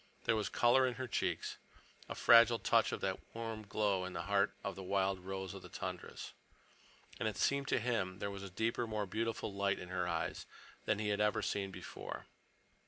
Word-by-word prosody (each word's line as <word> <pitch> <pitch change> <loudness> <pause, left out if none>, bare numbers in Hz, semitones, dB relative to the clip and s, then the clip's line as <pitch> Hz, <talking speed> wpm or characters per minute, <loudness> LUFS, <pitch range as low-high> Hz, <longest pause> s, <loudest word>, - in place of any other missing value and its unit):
There 115 - +3
was 105 -1 0
color 130 +2 +5
in 125 - -2
her 130 -1 -4
cheeks, - - -1 0.5
a - - -3
fragile 115 0 +7
touch - - +3
of - - -3
that - - -1 0.2
warm 115 -2 -4
glow 100 -3 +1
in 90 0 -5
the 85 -1 -3
heart 100 +2 +2
of 100 - -2
the 95 - -7
wild 95 0 +1
rose 95 0 -5
of - - -8
the - - -11
tundras. - - -6 0.9
And - - +1
it - - -7
seemed 140 0 +2
to - - +2
him 105 -6 -1
there 100 0 -3
was 100 -1 -6
a 100 - -6
deeper, 115 +5 0
more 105 -2 -1
beautiful 110 +1 -2
light 100 0 +1
in 90 - -8
her 90 -1 -1
eyes 85 -2 -2 0.4
than 105 - +2
he 105 0 -1
had 105 0 +1
ever 105 0 +2
seen 100 -1 -1
before. 95 - -7
100 Hz, 205 wpm, -36 LUFS, 95-115 Hz, 0.9 s, fragile